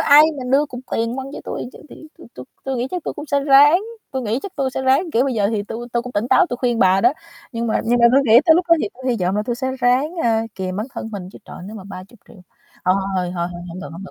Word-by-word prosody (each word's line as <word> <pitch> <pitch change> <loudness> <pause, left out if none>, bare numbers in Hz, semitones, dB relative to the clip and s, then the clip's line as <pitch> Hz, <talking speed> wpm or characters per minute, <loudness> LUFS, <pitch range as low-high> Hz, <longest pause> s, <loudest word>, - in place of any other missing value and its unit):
ai 290 +2 +7 0.2
mà 255 - -5
đưa 285 +3 +3
cục 250 -2 -8
tiền 230 +2 -1
quăng 265 0 -5
cho - - -7
tui - - -5
cho - - -13
thì 315 - -13
tui - - -13
tui 125 - -9 0.2
tui 265 -1 -2
nghĩ 245 +2 -1
chắc 360 -3 -4
tui - - -4
cũng 295 +1 -8
sẽ 280 0 +1
ráng, 290 +5 +6 0.3
tui 265 -2 -3
nghĩ 225 +3 -1
chắc 395 - -7
tôi 270 -2 0
sẽ 265 - -4
ráng, 270 +6 +2
kiểu, 245 +4 +3
bây 265 - -1
giờ 205 -3 +2
thì 215 -2 -1
tui 225 +3 -7
tui 235 - 0
cũng 250 +1 -8
tỉnh 215 +4 -1
táo, 355 +8 +5
tôi 245 - -3
khuyên 240 -2 0
bà 190 +1 +4
đó. 240 +5 +4 0.4
Nhưng 230 0 -2
mà 220 - 0
nhưng 240 +2 +2
mà 235 - +7
tôi 270 - +6
nghĩ 230 +2 +7
tới 320 - +6
lúc 355 +2 +2
đó 335 - +7
thì 210 - -1
tôi 260 - -13
hy 240 - 0
vọng 180 +2 0
là 210 - 0
tôi 240 -1 -2
sẽ 260 +1 -2
ráng, 255 +7 +2
a, 225 -1 +2
kìm 185 -1 -4
bản 215 - -3
thân 225 - -5
mình 185 -3 -6
chứ - - -12
trời, - - -11
nếu 215 +2 -8
mà 190 - -10
30.000.000, 195 +2 -12 0.5
thôi, 185 - +3 0.2
thôi, 180 -1 -1
thôi, 170 -1 -2
thôi, 175 - -8
hổng 175 +2 -8
được, 195 - -7
hổng 190 +4 -9
được, - - -11
240 Hz, 310 wpm, -20 LUFS, 205-270 Hz, 0.5 s, ai